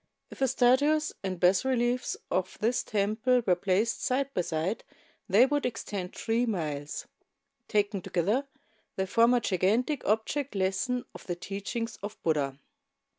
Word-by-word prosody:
If - - -11
the 265 - +3
statues 285 +5 +3
and 185 -2 -3
bas 180 +1 +4
reliefs 250 -1 0
of 185 0 -1
this 235 +3 +1
temple 220 +4 +1
were 185 - +4
placed 195 +5 0
side 275 +2 0
by 180 - +1
side 170 +5 -2 0.5
they 210 +7 +7
would 290 +1 0
extend 205 -6 -4
three 235 +2 0
miles. 150 -8 -3 0.6
Taken 205 -2 +1
together, 205 - 0 0.5
they 190 - 0
form 230 +5 +4
a - - +4
gigantic 220 - +1
object 225 +5 0
lesson 195 +7 0
of - - -12
the 175 - -1
teachings 200 +6 -4
of 205 +2 -6
Buddha. 145 -4 0
215 Hz, 145 wpm, -29 LUFS, 185-250 Hz, 0.6 s, they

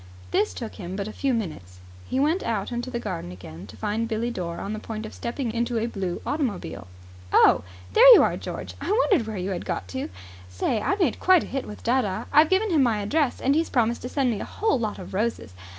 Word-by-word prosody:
This 210 - +1
took 230 -2 -6
him 185 -1 -6
but 200 0 -3
a 215 - -7
few 275 - 0
minutes. 155 - -4 0.3
He 260 - -1
went 310 +7 +2
out 220 -1 -2
into 240 +1 -3
the 240 -2 -3
garden 85 - -5
again 90 0 -10
to - - -13
find 220 +2 -1
Billie 230 +1 -1
Dore 170 -6 -4
on 200 - -4
the 215 - -4
point 220 0 -6
of 215 - -8
stepping 235 -1 -3
into 235 0 -1
a 225 - 0
blue 195 -6 -4
automobile. 250 - -3 0.4
"Oh, - - +5 0.3
there - - +9
you - - +7
are, - - +1
George. - - -6
I - - -4
wondered 400 - +3
where 215 -2 -4
you 185 +2 -2
had 180 - -3
got 90 - -3
to. 130 +3 -4 0.4
Say, 95 - -1
I 390 - +1
made 355 - +1
quite 370 -3 +5
a - - -6
hit 270 0 -4
with 210 - -9
dadda. 230 -4 0
I've 305 +2 +6
given 390 +2 +2
him 310 -4 +4
my 235 -4 +3
address, 270 +6 0
and 275 - +2
he's 325 +2 +1
promised 235 -1 +1
to 250 - -5
send 265 -2 +1
me 215 - -3
a - - -3
whole 430 - 0
lot 215 -3 -2
of - - -9
roses. 210 - -2
230 Hz, 240 wpm, -25 LUFS, 200-270 Hz, 0.4 s, there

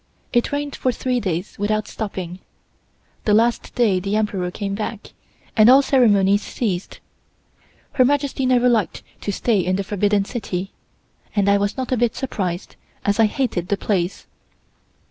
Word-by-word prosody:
It 240 -1 +2
rained 285 0 -2
for 255 - 0
three 250 +1 -1
days 185 -3 -3
without 215 +1 0
stopping. 185 -4 -5 0.9
The 210 - +4
last 230 +2 +1
day 215 -7 +3
the 195 +3 -2
Emperor 205 -4 0
came 195 +2 -4
back, 215 +1 -5 0.4
and 215 0 +7
all 270 +2 +7
ceremonies 205 -7 +4
ceased. 195 -7 -3 0.9
Her 255 - +4
Majesty 275 -1 +1
never 250 -1 +4
liked 225 -6 +1 0.2
to 205 - -2
stay 215 +1 +1
in 185 +1 0
the 195 - -1
Forbidden 205 0 +1
City, 195 -5 -4 0.6
and 200 -2 +2
I 200 0 +4
was 205 0 -1
not 260 -1 -3
a 255 - +2
bit 235 -1 +1
surprised, 185 -9 -4 0.3
as 205 +2 +1
I 225 - +6
hated 210 -7 -2
the 200 - 0
place. 190 -3 -1
210 Hz, 160 wpm, -21 LUFS, 195-240 Hz, 0.9 s, and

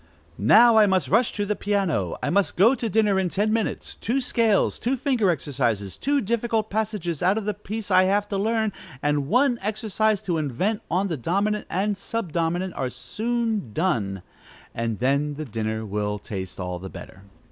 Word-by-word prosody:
"Now 225 - +6
I 215 -1 +7
must 190 -2 +1
rush 230 +4 +3
to 205 - -2
the 210 +1 -1
piano! 195 - -1
I - - 0
must 200 +1 +1
go 215 +8 +5
to 235 -3 -2
dinner 210 -1 +2
in 185 -2 0
ten 210 +4 0
minutes: 225 -1 -2
two 245 +5 -1
scales, 230 -5 +2
two 255 +3 0
finger 250 -7 +1
exercises, 125 - -1
two 280 +1 0
difficult 225 0 -1
passages 205 -7 -2
out 185 +4 +3
of 220 - -3
the 210 - 0
piece 210 +1 -6
I 185 0 +6
have 205 +2 +1
to 200 - -1
learn, 220 0 0 0.3
and 145 -1 +1
one 245 - +3
exercise 215 0 0
to 170 -3 -1
invent 155 - -1
on 190 +3 +1
the 165 -5 -3
dominant 200 - -1
and 200 +3 0
sub 195 -1 -4
dominant, 175 +2 -1
are 130 - -2
soon 225 - -2
done; 105 - -1 0.5
and 115 -2 -2
then 140 +4 +1
the 155 +1 -5
dinner 110 -2 -3
will 105 0 -2
taste 95 -4 -7
all 90 -1 -4
the 95 +1 -7
better." 95 - -11
195 Hz, 185 wpm, -24 LUFS, 140-220 Hz, 0.5 s, I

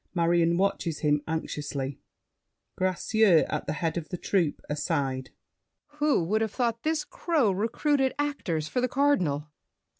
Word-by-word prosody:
Marion 170 0 +3
watches 185 -4 0
him 150 -1 +2
anxiously. 145 -4 -3 0.8
GRACIEUX 185 0 +3
(at 150 -1 -3
head 160 +2 -1
of 160 -2 -5
troupe, 175 -7 0
aside). 140 -4 -2 0.7
Who 295 - +3
would 215 +6 0
have 220 -2 -1
thought 230 -2 0
this 310 +2 0
crow 300 - +1
Recruited 260 +7 +1
actors 205 - -2
for 250 - -1
the 255 - +2
Cardinal? 180 - +1
175 Hz, 125 wpm, -27 LUFS, 155-240 Hz, 0.8 s, Marion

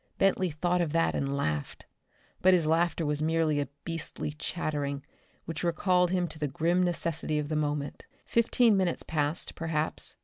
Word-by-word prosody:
Bentley 190 -1 +2
thought 175 +3 0
of 160 -3 -1
that 165 0 +2
and 140 0 -1
laughed; 75 - -3 0.6
but 185 0 +6
his 170 -3 +1
laughter 165 +1 +2
was 150 0 0
merely 160 -1 +2
a 145 - -1 0.2
beastly 165 -3 -4
chattering 145 -3 -3 0.4
which 165 +1 -5
recalled 180 +1 +2
him 180 -1 +1
to 155 - -9
the 150 - 0
grim 170 +5 +1
necessity 165 -3 0
of 150 -1 -2
the 155 - -1
moment. 145 -1 -2 0.2
Fifteen 235 -1 +3
minutes 185 -3 +1
passed, 150 +1 -1
perhaps. 160 -1 -1
160 Hz, 165 wpm, -29 LUFS, 150-175 Hz, 0.6 s, but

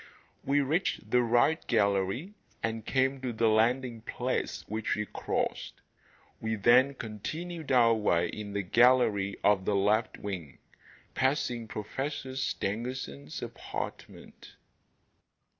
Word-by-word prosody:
We 145 +1 +2
reached 140 - -1
the 125 - +5
'right' 120 +7 +2
gallery 100 - +1 0.3
and 115 0 -2
came 135 +2 +1
to 130 -2 -2
the 115 0 +2
landing 115 +2 +2
place 125 +3 -3
which 110 +1 -1
we 105 - -2
crossed. - - -3 0.6
We 110 0 -1
then 125 +6 +5
continued 155 - -5
our 120 -3 +6
way 90 -6 +1
in 105 -1 -6
the 100 0 -1
gallery 110 -2 +3
of 100 -2 +3
the 105 - +1
left 105 +3 +2
wing, 90 -9 -6 0.6
passing 125 -4 0
Professor 130 +5 -4
Stangerson's 105 - -3
apartment. - - -7
115 Hz, 115 wpm, -30 LUFS, 105-130 Hz, 0.6 s, our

